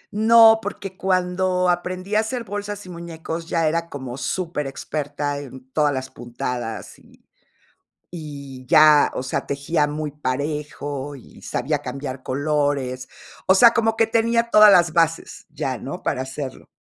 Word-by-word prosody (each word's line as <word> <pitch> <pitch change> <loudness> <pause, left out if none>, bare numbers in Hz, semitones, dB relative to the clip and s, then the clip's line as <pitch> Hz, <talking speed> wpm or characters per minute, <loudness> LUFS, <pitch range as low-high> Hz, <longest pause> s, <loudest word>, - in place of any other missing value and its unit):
No, 225 0 +7
porque 195 -2 -6
cuando 185 -1 0
aprendí 180 +3 -2
a 210 - +4
hacer 230 +2 -2
bolsas 205 -1 -6
y - - -11
muñecos, 165 -1 -6
ya 165 -2 +1
era 170 +1 -1
como 130 -3 -7
superexperta 145 -2 -3
en 130 -1 -11
todas 150 0 +2
las 130 -1 -4
puntadas, 120 -1 -6
y - - -23 0.8
y 140 -6 -9
ya, 150 -1 +6
o - - -3
sea, 130 - -3
tejía 145 +2 0
muy 150 0 -4
parejo, 145 0 -4
y 130 - -15
sabía 145 +4 -2
cambiar 135 -2 -6
colores. 140 -2 -1 0.4
O 190 - +5
sea, 235 +5 +8
como 225 -1 +1
que 225 - +3
tenía 230 +1 +1
todas 215 -2 +8
las 170 -4 +4
bases 165 -1 0
ya, 145 -4 -3
¿no?, 135 - -7
para 130 - -1
hacerlo. 135 0 -7
155 Hz, 145 wpm, -22 LUFS, 140-185 Hz, 0.8 s, sea